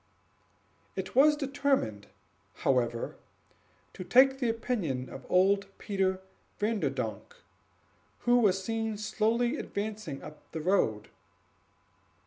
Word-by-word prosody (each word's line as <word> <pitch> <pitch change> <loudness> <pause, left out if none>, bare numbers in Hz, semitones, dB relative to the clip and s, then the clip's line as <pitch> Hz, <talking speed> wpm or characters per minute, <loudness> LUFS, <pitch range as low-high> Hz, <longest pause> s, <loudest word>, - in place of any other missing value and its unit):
It 190 - -4
was 300 +3 +6
determined, 275 - -1 0.6
however, 120 -3 +1 0.8
to 185 - -7
take 265 +7 +5
the 245 -3 +1
opinion 200 - -2
of 135 - -10
old 195 +2 +3
Peter 190 -2 -1 0.4
Vanderdonk, 135 - -2 0.9
who 245 0 +4
was 195 -4 +2
seen 225 0 -2
slowly 230 +5 0
advancing 205 - -5
up 150 0 -10
the 160 - -3
road. 135 - +1
200 Hz, 100 wpm, -30 LUFS, 150-235 Hz, 0.9 s, was